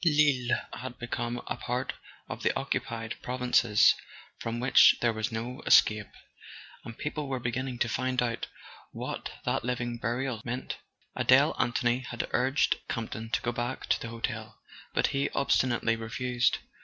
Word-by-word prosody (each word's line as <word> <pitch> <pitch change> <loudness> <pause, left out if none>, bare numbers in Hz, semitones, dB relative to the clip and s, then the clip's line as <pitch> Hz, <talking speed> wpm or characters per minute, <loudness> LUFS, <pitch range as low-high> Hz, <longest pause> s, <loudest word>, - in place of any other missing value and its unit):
Lille 145 -6 +3 0.2
had 130 -1 -7
become 120 0 -3
a - - -3
part 125 +1 -2 0.3
of - - -6
the - - +3
"occupied 115 -1 -3
prov¬ 125 +1 -4
inces," 120 -4 +5 0.5
from 115 +1 -3
which 125 +2 +7
there 120 -1 +2
was 110 +2 -2
no 120 +3 -4
escape; 105 -1 +5 0.8
and 115 - -9
people 150 -1 -3
were 135 -1 -2
beginning 125 +1 -2
to 120 - +1
find 130 +2 -1
out 120 -1 -1 0.5
what - - -5
that - - 0
living 120 -1 -2
burial 120 0 -2
meant. 125 +2 -4 0.4
Adele - - +5
Anthony 120 0 +2
had 120 -2 -4
urged 130 +3 +2
Campton 115 -1 -4
to - - 0
go 120 - 0
back 120 +2 -3
to - - +2
the 115 - -5
hotel, 115 -1 -4 0.4
but - - +3
he 140 0 +1
obstinately 120 -4 +2
refused. 120 +1 0
120 Hz, 155 wpm, -29 LUFS, 115-130 Hz, 0.8 s, which